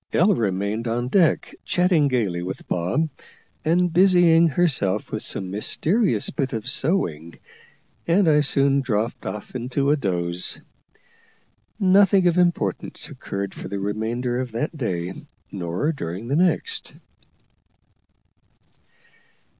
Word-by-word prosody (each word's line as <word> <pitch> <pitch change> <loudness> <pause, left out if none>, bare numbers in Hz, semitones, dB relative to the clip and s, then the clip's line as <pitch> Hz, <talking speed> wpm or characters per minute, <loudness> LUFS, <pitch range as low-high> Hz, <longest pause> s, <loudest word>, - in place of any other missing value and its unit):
Ella 195 +5 +4
remained 105 - -1
on 120 +2 -2
deck 170 +2 +2
chatting 175 -5 +2
gaily 105 -10 -1
with 90 +2 -6
Bob, 90 - 0 0.6
and 175 +2 +2
busying 175 -3 +5
herself 130 - 0
with 110 - -3
some 95 -1 -3
mysterious 180 - +1
bit 135 -4 -2
of 110 +1 -4
sewing, 110 - -1 0.7
and 175 +2 +3
I 150 -1 +5
soon 140 -1 +3
dropped 115 -2 -2
off 105 - -6
into 130 +3 -1
a - - +4
doze. 90 -8 -2 1.2
Nothing 195 -1 +4
of 175 0 +3
importance 170 - -1
occurred 100 0 -5
for - - -8
the 100 - -4
remainder 115 +5 -2
of 125 -3 -4
that 150 +8 -3
day, 95 - -3 0.4
nor 90 - -2
during 100 - -6
the 140 - +1
next. 435 - 0
130 Hz, 120 wpm, -23 LUFS, 100-170 Hz, 1.2 s, busying